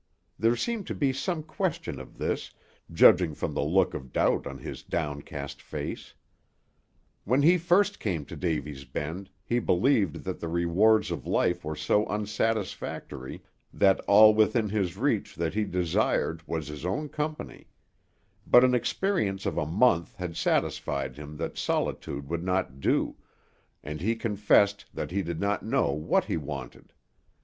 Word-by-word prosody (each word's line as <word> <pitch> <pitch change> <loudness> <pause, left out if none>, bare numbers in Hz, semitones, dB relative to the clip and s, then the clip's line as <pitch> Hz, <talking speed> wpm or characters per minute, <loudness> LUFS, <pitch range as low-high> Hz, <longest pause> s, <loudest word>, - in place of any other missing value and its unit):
There 115 +2 +3
seemed 225 - -3
to - - -4
be 135 -3 +1
some 160 +4 -2
question 155 - -3
of 65 - -12
this, - - -2 0.4
judging 85 -1 +5
from - - -3
the - - -1
look 90 +5 +2
of 65 -3 -7
doubt - - +1
on - - -6
his - - -7
downcast 75 -2 -4
face. - - -6 1.1
When 130 +7 +2
he 175 +4 +5
first 190 +5 +2
came 85 -9 -2
to - - -9
Davy's 75 -5 -3
Bend, 80 +9 -5
he 120 +3 0
believed 100 - +2
that - - -4
the 85 - -4
rewards 85 +6 +3
of - - -5
life 90 0 +1
were 80 0 -4
so 80 +8 +1
unsatisfactory 105 -9 -3 0.3
that 95 -1 +3
all 110 +2 +8
within 110 0 +2
his 95 -4 -1
reach 115 -3 0
that 85 -1 -2
he 105 +1 0
desired 85 -2 0
was 80 -3 -3
his 75 0 -7
own 100 - -2
company; 150 +1 -5 0.8
but 125 - +7
an 130 0 +4
experience 120 - 0
of - - -1
a 75 - -1
month 85 -1 +2
had 90 -3 -5
satisfied 70 -2 -1
him 75 +1 -9
that - - -4
solitude 70 0 -2
would 85 +2 -3
not 90 -8 -1
do, - - 0 0.7
and 75 +1 -6
he 110 +5 +1
confessed 105 -2 +2
that 75 - -4
he 100 +2 0
did 85 -2 -4
not 100 0 0
know - - +1
what 75 +2 +1
he - - -1
wanted. 70 -4 -7
95 Hz, 155 wpm, -28 LUFS, 80-115 Hz, 1.1 s, all